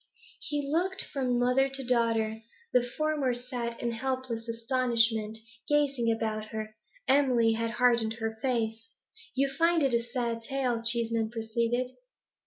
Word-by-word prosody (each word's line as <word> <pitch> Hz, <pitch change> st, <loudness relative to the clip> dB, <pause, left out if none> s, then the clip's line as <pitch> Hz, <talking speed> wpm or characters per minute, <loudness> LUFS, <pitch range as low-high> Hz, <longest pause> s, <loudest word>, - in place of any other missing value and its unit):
He 290 Hz, -1 st, -3 dB
looked 365 Hz, +6 st, 0 dB
from 255 Hz, -3 st, -1 dB
mother 250 Hz, +2 st, +3 dB
to 270 Hz, -1 st, -3 dB
daughter. 225 Hz, -2 st, +1 dB, 0.3 s
The 250 Hz, -, +6 dB, 0.2 s
former 300 Hz, -5 st, +1 dB
sat 245 Hz, -1 st, -4 dB
in 235 Hz, -, -1 dB
helpless 255 Hz, -1 st, -3 dB
astonishment, 230 Hz, -2 st, +2 dB, 0.3 s
gazing 275 Hz, -5 st, +2 dB
about 220 Hz, -1 st, -2 dB
her; 215 Hz, 0 st, -6 dB, 0.3 s
Emily 255 Hz, -4 st, +4 dB
had 230 Hz, +1 st, -1 dB
hardened 235 Hz, -2 st, +2 dB
her 225 Hz, -1 st, -3 dB
face. 225 Hz, -3 st, -1 dB, 0.5 s
'You 275 Hz, +1 st, +3 dB
find 335 Hz, +1 st, +3 dB
it 270 Hz, -3 st, +2 dB
a 235 Hz, -, +3 dB
sad 235 Hz, -1 st, -2 dB
tale,' 250 Hz, -2 st, -1 dB
Cheeseman 230 Hz, -1 st, 0 dB
proceeded. 235 Hz, +2 st, -1 dB
240 Hz, 135 wpm, -29 LUFS, 225-265 Hz, 0.5 s, The